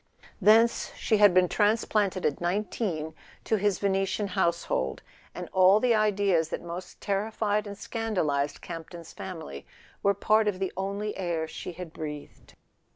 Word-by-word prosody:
Thence 225 +4 +4
she 220 - +1
had 205 -1 +7
been 180 0 +4
transplanted 205 -2 +1
at 145 - 0
nineteen 175 -3 -2 0.3
to 220 - +1
his 200 -1 +1
Venetian 195 +1 0
house¬ 170 -4 0
hold, 65 +1 -2 0.3
and - - -6
all 190 +2 +6
the 245 +1 +3
ideas 200 -6 +2
that - - -4
most 175 +2 -8
terrified 210 +1 -1
and 200 - -6
scandal¬ 215 -7 -2
ized 140 +1 -1
Campton's 165 0 -9
family 160 - -7 0.4
were 200 0 +3
part 215 +2 +3
of 205 -3 0
the 190 0 -3
only 200 +2 -3
air 170 -4 -2
she 175 - -7
had 170 -1 -8
breathed. 150 -2 -8
195 Hz, 155 wpm, -28 LUFS, 170-210 Hz, 0.4 s, had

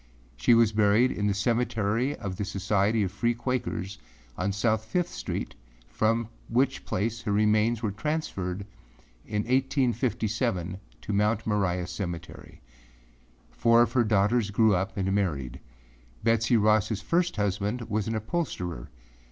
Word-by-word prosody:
She - - +4
was 115 -2 +4
buried 110 +3 +3
in 105 0 -1
the 100 - +2
Cemetery 115 +3 0
of 95 -2 -5
the - - -2
Society 100 +2 +1
of 95 - -2
Free 115 +4 0
Quakers 115 -6 -3 0.4
on 95 +7 -1
South 110 +2 +1
Fifth 175 +10 -1
Street, - - -4 0.4
from 115 +1 +1 0.2
which 130 +3 +1
place 115 +4 -2
her 110 - -2
remains 110 +2 +2
were 105 - 0
transferred 100 - -3 0.6
in 105 -1 -1
1857 115 - 0 0.2
to 105 - -4
Mount 105 +2 +1
Moriah 95 -4 0
Cemetery. 85 -2 -7 0.9
Four 115 +1 +4
of - - -2
her 125 -2 +4
daughters 105 +1 +2
grew 110 +1 +4
up 95 +4 -1
and 95 0 0
married. 75 -11 -1 0.6
Betsey 115 +1 +3
Rossâ 105 -1 +2
first 175 +1 +1
husband 105 +3 -1
was 110 -2 -2
an 115 - -1
upholsterer. 105 - -3
105 Hz, 135 wpm, -27 LUFS, 100-115 Hz, 0.9 s, She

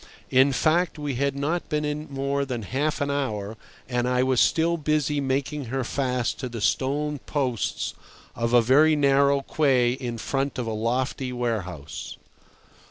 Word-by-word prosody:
In 130 +2 +5
fact, 160 +7 +1
we 145 -2 -3
had 140 +2 0
not 155 +5 -2
been 150 0 0
in 150 +1 -3
more 140 +1 -1
than 125 -4 -4
half 145 +8 -1
an 140 0 0
hour 110 -7 -2 0.3
and 125 -1 0
I 125 0 +2
was 130 -2 +3
still 170 +1 +3
busy 150 -2 0
making 135 +1 -1
her 130 +3 -2
fast 125 -1 -1
to 130 - -4
the 115 -1 -6
stone 145 +6 0
posts 130 -5 -2 0.4
of 115 0 -1
a 120 -1 +6
very 150 +6 +5
narrow 140 -1 +3
quay 135 -4 +2
in 125 -2 -4
front 135 +4 -2
of 125 - -2
a 110 - -3
lofty 125 +4 -1
warehouse. 95 - -4
135 Hz, 165 wpm, -25 LUFS, 125-145 Hz, 0.4 s, a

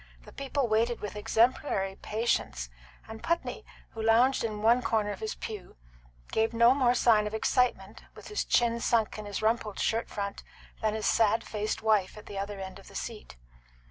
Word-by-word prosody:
The - - -13
people 275 -1 -1
waited 230 +2 +1
with 210 -1 -6
exemplary 210 -2 +1
patience, 135 - -1 0.4
and 220 0 -9
Putney, 335 +1 -2 0.3
who 225 - -6
lounged 235 +4 +4
in 215 -2 -3
one 235 +3 +5
corner 215 -4 0
of 200 - -6
his 220 - -4
pew, 210 -4 -7 0.6
gave 225 +1 +1
no 235 +2 +6
more 250 -3 +3
sign 215 -4 +4
of 210 - -4
excitement, 220 -4 0
with - - -11
his 420 - -1
chin 235 -1 +2
sunk 225 -2 +1
in 210 - -7
his 205 +1 -4
rumpled 220 -2 0
shirt 225 +1 0
front, 200 -1 -4 0.4
than 215 -1 +1
his 220 - -3
sad 225 0 +3
faced 215 0 -3
wife 215 -3 +2
at 210 - -11
the 200 - -6
other 200 0 -4
end 190 0 -7
of 195 - -16
the - - -14
seat. 220 - -6
220 Hz, 185 wpm, -29 LUFS, 210-235 Hz, 0.6 s, no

